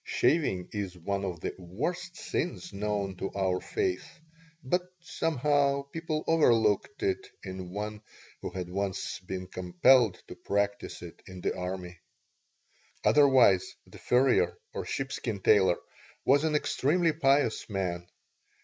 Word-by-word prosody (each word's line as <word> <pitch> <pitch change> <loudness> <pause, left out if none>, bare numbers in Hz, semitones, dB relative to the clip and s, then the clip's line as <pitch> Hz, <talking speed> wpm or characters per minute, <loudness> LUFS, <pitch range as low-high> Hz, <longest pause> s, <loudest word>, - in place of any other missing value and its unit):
Shaving 120 - +1
is 100 -4 -4
one 100 +3 -2
of 90 -4 -4
the - - -3
worst 170 - -4
sins 180 +1 -3
known 100 -2 -2
to 95 - -3
our 95 -2 +1
faith, 375 - -3 0.4
but, 175 +8 +1 0.2
somehow, 145 -4 +1
people 155 +2 -4
overlooked 150 - +3
it 390 +1 0 0.2
in 95 -1 -6
one 105 +2 -5 0.4
who - - -4
had 90 -2 -5
once 95 0 -3
been 95 0 -5
compelled 90 +5 +3
to - - -8
practise 100 -2 -2
it 85 - -10
in 95 -1 -9
the - - -1
army. 90 -1 -5 1.0
Otherwise 130 -10 +5
the - - -14
furrier 125 +1 +3 0.2
or - - -4
sheepskin 130 -6 -3
tailor 95 -2 +4 0.5
was 140 +3 +4
an 155 -1 +1
extremely 160 +3 +2
pious 140 -7 +2
man. 90 -3 -2
105 Hz, 130 wpm, -29 LUFS, 95-145 Hz, 1.0 s, Otherwise